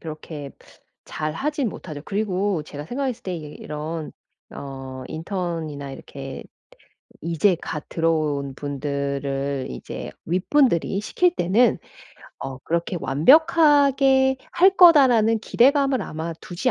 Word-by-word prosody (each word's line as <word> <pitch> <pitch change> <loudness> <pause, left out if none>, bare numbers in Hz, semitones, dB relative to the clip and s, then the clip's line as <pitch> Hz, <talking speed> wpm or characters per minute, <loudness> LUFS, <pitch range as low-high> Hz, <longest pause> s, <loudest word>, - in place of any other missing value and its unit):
그렇게 155 -2 -8 0.5
잘 155 0 -4
하진 285 - -1
못하죠. 150 -7 -8
그리고 200 -4 -1
제가 145 0 -8
생각했을 255 - -3
때 185 -2 -4
이 160 - -6
이런 155 +1 -5 0.4
어 135 -1 -8
인턴이나 160 -5 -4
이렇게 135 0 -8 0.8
이제 170 +3 +2
갓 150 -1 -5
들어온 155 -4 -1
분들을 140 -1 -3
이제 60 - -7 0.2
윗분들이 195 - +2
시킬 355 +11 +1
때는 205 +8 +3 0.6
어 135 -1 -6
그렇게 170 +5 -2
'완벽하게 275 - +4 0.2
할 380 +2 +5
거다.'라는 255 - +6
기대감을 270 +2 +3
아마 165 -2 -5
두지 185 +9 -2
170 Hz, 250 characters per minute, -23 LUFS, -, 0.8 s, 거다.'라는